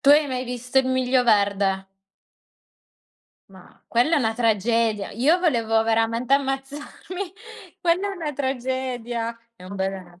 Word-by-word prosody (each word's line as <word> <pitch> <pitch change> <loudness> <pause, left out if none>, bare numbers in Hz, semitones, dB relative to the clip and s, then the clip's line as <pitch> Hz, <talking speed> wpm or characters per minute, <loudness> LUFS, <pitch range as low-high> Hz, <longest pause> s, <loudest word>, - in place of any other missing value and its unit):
Tu 275 - +1
hai 295 +1 +6
mai 255 -2 -3
visto 250 +1 -1
"Il 265 - +2
miglio 260 0 +2
verde"? 200 -3 +2 1.7
Ma 190 -2 -17
quella 250 +8 +3
è - - +4
una 225 -4 0
tragedia. 225 -1 +1
Io 285 - +3
volevo 230 -10 +2
veramente 225 +3 +1
ammazzarmi. 285 +7 -4 0.5
Quella 360 +3 +1
è - - -5
una 325 -5 -4
tragedia. 250 -3 -3 0.2
È 180 - -14
un 190 +2 -8
bel 190 -2 -5
245 Hz, 135 wpm, -23 LUFS, 225-270 Hz, 1.7 s, hai